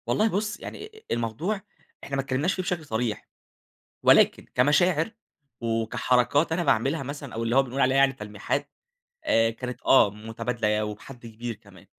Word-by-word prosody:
والله 215 - +2
بُص، 210 +1 -2
آآ، - - -25
يعني 435 +1 -9
الموضوع 120 - -2 0.4
إحنا 140 - -4
ما 135 - +1
تكلمناش 135 +7 0
في 185 - -2
بشكل 180 -3 -3
صريح، 110 -3 -2 0.8
ولكن - - +5
كمشاعر 155 - +3 0.5
وكحركات 120 +6 +1
أنا 175 +2 0
باعملها 135 +3 +1
مثلًا 140 0 -7
أو 115 - -3
اللي 115 +2 0
هو 135 - +6
بنقول 135 +1 -3
عليها 130 +1 +3
يعني 135 0 +5
تلميحات 105 -4 -3 0.5
آآ، 115 0 +3
كانت 125 +2 -6
آه 125 -6 +6
متبادلة 110 0 -2
وبحد 120 +4 -9
كبير 115 +1 -6
كمان، - - -18
125 Hz, 155 wpm, -26 LUFS, 115-155 Hz, 0.8 s, هو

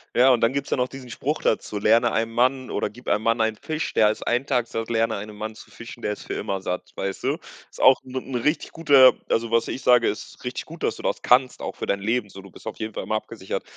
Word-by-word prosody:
Ja, 130 +2 +6
und 120 - +3
dann 115 +3 +3
gibt's 140 0 -3
ja - - +2
noch 125 0 +1
diesen 130 -3 -10
Spruch 150 +6 -2
dazu: 105 -1 0
„Lerne 115 +3 +4
einem 115 +1 0
Mann 130 +2 +1
oder - - -1
gib 125 - -16
einem 105 +1 +1
Mann 115 0 +2
einen 110 -1 +1
Fisch, 155 +5 -4
der 105 -1 +5
ist 110 - -4
1 125 +4 0
Tag 125 -4 +1
satt, 115 0 -4
lerne 115 0 +1
einem 105 +1 -8
Mann 110 +1 -5
zu 110 - -14
fischen, 115 +3 -11
der 105 - -1
ist - - -10
für - - -5
immer 95 -1 -3
satt,“ 90 -1 -4
weißt 95 0 -4
du? - - +1 0.3
Ist - - -15
auch 130 0 +6
'n 130 0 -11
'n 130 0 -4
richtig 150 +7 0
guter 140 -5 +6 0.2
also 115 0 0
was 115 0 +2
ich 130 - -5
sage, 125 -2 +5
ist - - -7
richtig - - -4
gut, - - -11
dass - - 0
du - - -11
das - - -1
kannst, 125 +1 +3
auch - - -5
für - - -5
dein 100 - 0
Leben 110 +1 0
so, 95 - -11
du 100 - -13
bist - - -16
auf 110 - -6
jeden 110 -1 -5
Fall - - -3
immer 110 - -2
abgesichert. 110 -3 -5
115 Hz, 280 wpm, -24 LUFS, 110-130 Hz, 0.3 s, Ja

